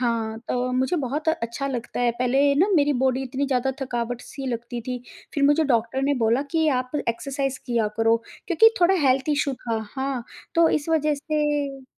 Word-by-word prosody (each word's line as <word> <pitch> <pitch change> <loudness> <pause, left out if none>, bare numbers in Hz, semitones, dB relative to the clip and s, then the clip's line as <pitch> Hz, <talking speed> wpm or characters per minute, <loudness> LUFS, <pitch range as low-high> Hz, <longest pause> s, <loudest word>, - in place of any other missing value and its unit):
हाँ, 225 -2 -1
तो 250 0 0
मुझे 260 +7 +1
बहुत 295 +3 -2
अच्छा 275 -3 -1
लगता 245 -2 -4
है। 245 -1 +3
पहले 270 +3 +3
ना 375 - +4
मेरी 290 0 +3
बॉडी 260 0 +2
इतनी 265 +2 -2
ज़्यादा 265 0 +1
थकावट-सी 245 +2 -4
लगती 235 0 -4
थी, 250 +1 -5 0.3
फिर 285 -1 +2
मुझे 295 +2 +4
डॉक्टर 240 0 +1
ने 285 +1 +2
बोला 235 +5 +3
कि, 320 -1 +2
"आप 255 -3 0 0.2
एक्सरसाइज़ 270 +3 -2
किया 235 -3 +1
करो।" 225 0 +4 0.3
क्योंकि 395 +6 +6
थोड़ा 360 +2 +5
हेल्थ 260 +3 +2
इश्यू 285 -2 +1
था, 230 -3 -3 0.2
हाँ, 265 -2 -2 0.3
तो 335 -1 +5
इस 305 +1 -1
वज़ह 305 -2 +2
से 290 -2 -2
265 Hz, 180 wpm, -24 LUFS, 245-290 Hz, 0.3 s, क्योंकि